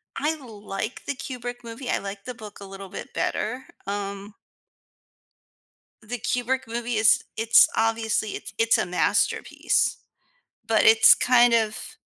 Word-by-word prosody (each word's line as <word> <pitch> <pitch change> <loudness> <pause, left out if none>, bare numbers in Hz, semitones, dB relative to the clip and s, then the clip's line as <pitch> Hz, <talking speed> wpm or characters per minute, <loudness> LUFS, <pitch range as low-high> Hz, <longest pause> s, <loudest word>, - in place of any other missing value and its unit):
I 315 +2 -1
like 210 -4 -7
the 285 - -2
Kubrick 245 -2 -7
movie, 230 +3 -8
I - - +1
like 200 0 -8
the 250 - -5
book 215 -4 -11
a 200 - -9
little 195 0 -10
bit - - -9
better, 250 +5 -2 0.2
um 200 0 -5 1.7
the 240 +3 -5
Kubrick 250 +3 -1
movie 235 0 -3
is 220 +1 +4
it's 225 +1 +6
obviously 225 -1 0
it's - - -7
it's 230 0 +3
a - - 0
masterpiece, 180 0 0 0.7
but 225 -1 +3
it's 225 0 +8
kind 245 -1 +4
of 220 -2 -1
225 Hz, 140 wpm, -24 LUFS, 210-245 Hz, 1.7 s, it's